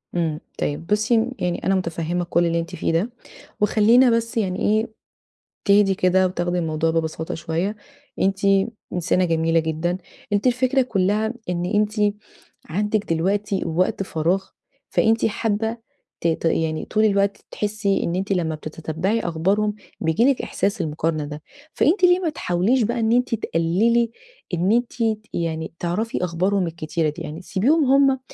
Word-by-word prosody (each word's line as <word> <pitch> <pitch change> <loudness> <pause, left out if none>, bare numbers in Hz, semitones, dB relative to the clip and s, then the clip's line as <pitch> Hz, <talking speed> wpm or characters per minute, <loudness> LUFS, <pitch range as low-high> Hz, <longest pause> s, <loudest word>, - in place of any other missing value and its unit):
إمم. 160 -3 0 0.2
طيب 150 +3 -3
بُصّي، 215 +3 +2
م 230 +3 0
يعني 175 -1 -2
أنا 195 - +3
مُتفهِّمة 170 -1 -2
كل 175 0 +1
اللي 170 0 +1
أنتِ 165 - -5
فيه - - -1
ده. 170 +8 +1 0.5
وخلّينا 225 +5 +5
بس 230 0 0
يعني 190 -4 0
إيه، 215 +2 +2 0.8
تهدي 200 -1 +4
كده 185 +1 +3
وتاخدي 175 -1 -1
الموضوع 160 -1 0
ببساطة 160 0 -2
شوية. 170 +6 -2 0.5
أنتِ 195 0 +1 0.5
إنسانة 180 +1 +1
جميلة 165 0 +2
جدًا. 160 +2 -1 0.4
أنتِ 205 +5 +2
الفكرة 255 +2 +2
كُلّها 215 -1 0 0.2
إن 175 0 -1
أنتِ 210 +1 +1 0.5
عندِك 210 +1 -1
دلوقتي 195 +4 0
وقت 175 +4 0
فراغ 180 +2 0 0.5
فأنتِ 225 0 +2
حابّة 220 +1 -1 0.4
ت - - +1
ت 165 0 -1
يعني 160 -1 0
طول 215 0 +2
الوقت 200 -1 +2
ت - - -28
تحسّي 210 -1 -1
إن 170 - -1
أنتِ 195 +2 -2
لمّا 165 -4 0
بتتتبّعي 165 +7 -2
أخبارهم 195 +5 0 0.3
بييجي 160 +8 +2
لِك 275 -1 +3
إحساس 200 +3 -1
المقارنة 155 0 -1
ده. 150 +1 -7 0.3
فأنتِ 360 +6 +2
ليه 355 0 +6
ما 355 -3 0
تحاوليش 220 - +1
بقى 235 +2 -1
إن 225 0 +1
أنتِ 245 0 +2
تقلّلي 220 +6 +1 0.4
إن 175 +3 +1
أنتِ 240 +1 +2
ت 225 -3 0 0.2
يعني 160 -1 -3
تعرفي 180 +4 -2
أخبارهم 180 +2 0
الكتيرة 160 -1 -2
دي؟ 155 +3 -7
يعني 160 +1 -6
سيبيهم 265 - +2
هم 270 0 +4
190 Hz, 155 wpm, -22 LUFS, 165-220 Hz, 0.8 s, ليه